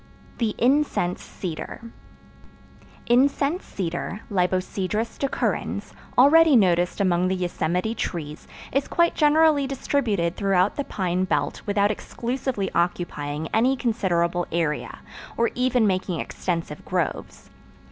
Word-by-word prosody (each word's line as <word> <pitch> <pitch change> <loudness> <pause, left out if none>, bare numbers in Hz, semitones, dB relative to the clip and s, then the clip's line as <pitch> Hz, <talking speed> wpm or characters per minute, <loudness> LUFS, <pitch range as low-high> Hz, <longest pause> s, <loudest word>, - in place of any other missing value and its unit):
The 225 -3 0
Incense 255 -8 +1
Cedar 170 -5 -6 1.3
Incense 280 +7 +2
Cedar 180 +2 -4
(Libocedrus 185 +3 -1
decurrens), 275 - -2 0.2
already 305 +3 +7
noticed 180 -5 +3
among 180 -2 +2
the 190 - 0
Yosemite 180 +3 -1
trees, 155 -8 -5 0.2
is 275 +1 0
quite 340 0 +2
generally 300 -2 +4
distributed 220 -10 -1
throughout 195 -1 +2
the 285 - -3
pine 185 -1 -1
belt 190 - -1
without 205 0 +2
exclusively 235 -2 -3
occupying 160 -3 -2
any 250 +4 +3
considerable 175 -7 0
area, 160 -3 -2 0.4
or 235 0 +2
even 250 -2 +2
making 185 -3 0
extensive 165 -4 -4
groves. 180 -4 -3
200 Hz, 105 wpm, -24 LUFS, 175-255 Hz, 1.3 s, already